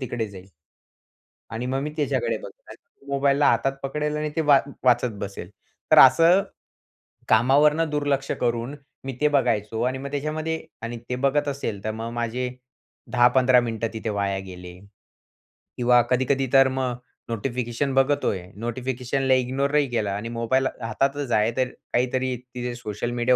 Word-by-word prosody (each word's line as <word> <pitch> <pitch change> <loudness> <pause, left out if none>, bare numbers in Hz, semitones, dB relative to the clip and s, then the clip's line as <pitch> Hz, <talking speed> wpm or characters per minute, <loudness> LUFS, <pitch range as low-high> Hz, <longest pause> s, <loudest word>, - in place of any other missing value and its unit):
तिकडे 120 -3 -3
जाईल. 95 -1 -12 1.0
आणि 115 +2 -4
मग 135 +1 -1
मी 150 - -3
त्याच्याकडे 155 - 0
बघणार. - - -12 0.3
मोबाईलला 140 +1 +2
हातात 125 +4 +1
पकडेल 150 +2 -2
आणि 150 0 -2
ते 160 - +1
वा 145 -3 +6 0.2
वाचत 125 -1 +3
बसेल. 100 -3 -6 0.4
तर - - +7
असं 165 +8 +7 0.9
कामावरनं 150 +7 +4
दुर्लक्ष 145 -2 -1
करून 120 +3 -1 0.3
मी 135 0 -4
ते 150 - +5
बघायचो. 110 -6 0
आणि 130 +1 0
मग 140 +1 -7
त्याच्यामध्ये 155 +3 -3 0.2
आणि 115 +1 -5
ते 125 - -1
बघत 145 +1 +2
असेल 130 -8 -4
तर 110 - -1
मग 115 +1 -5
माझे 120 +2 -2 0.6
10-15 125 +1 +5
मिनिटं 115 -1 -2
तिथे 110 0 -4
वाया 100 -1 -1
गेले 90 -1 -10 1.0
किंवा 125 0 +5
कधी-कधी 130 +2 +1
तर 135 0 +7
मग 130 -2 -1 0.3
नोटिफिकेशन 120 +3 -2
बघतोय, 135 -8 +1
नोटिफिकेशनला 125 +3 -1
इग्नोरही 135 +3 +1
केलं 110 -4 -1
आणि 105 +4 -4
मोबाईल 120 +3 0
हातातच 135 +3 -1
आहे 110 +1 +3
तर 130 - +2 0.3
काहीतरी 130 +1 0
तिथे 125 0 -6
सोशल 110 0 -4
मीडिया 120 +1 +2
125 Hz, 145 wpm, -24 LUFS, 115-140 Hz, 1.0 s, तर